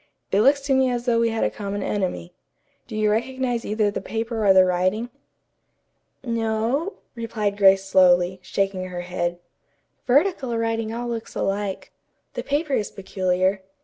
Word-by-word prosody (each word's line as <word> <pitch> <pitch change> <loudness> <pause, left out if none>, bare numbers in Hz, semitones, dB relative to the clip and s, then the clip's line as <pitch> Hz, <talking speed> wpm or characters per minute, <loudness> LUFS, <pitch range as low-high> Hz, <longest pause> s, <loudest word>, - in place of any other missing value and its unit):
It 200 - +3
looks 280 +4 +4
to 275 0 0
me 265 -1 +3
as 245 -1 -2
though 235 -2 +2
we 230 0 +2
had 225 0 -1
a - - +1
common 205 -1 -4
enemy. 180 - -3 0.5
Do - - -7
you 215 -1 +2
recognize 245 +1 -1
either 210 0 0
the - - -4
paper 225 +2 -3
or 200 - +6
the 190 -1 +7
writing?" 185 +6 0 1.1
"No," 230 - -1 0.2
replied 220 -3 -2
Grace 195 -1 +5
slowly, 185 -1 +4
shaking 195 -1 -2
her 180 -1 -5
head. 175 -1 -2 0.7
"Vertical 265 -3 +2
writing 225 -1 -1
all 240 +1 -4
looks 230 -1 -5
alike. 195 0 -2 0.4
The - - -3
paper 290 +1 -1
is 210 - 0
peculiar. 190 0 -1
215 Hz, 155 wpm, -23 LUFS, 190-235 Hz, 1.1 s, the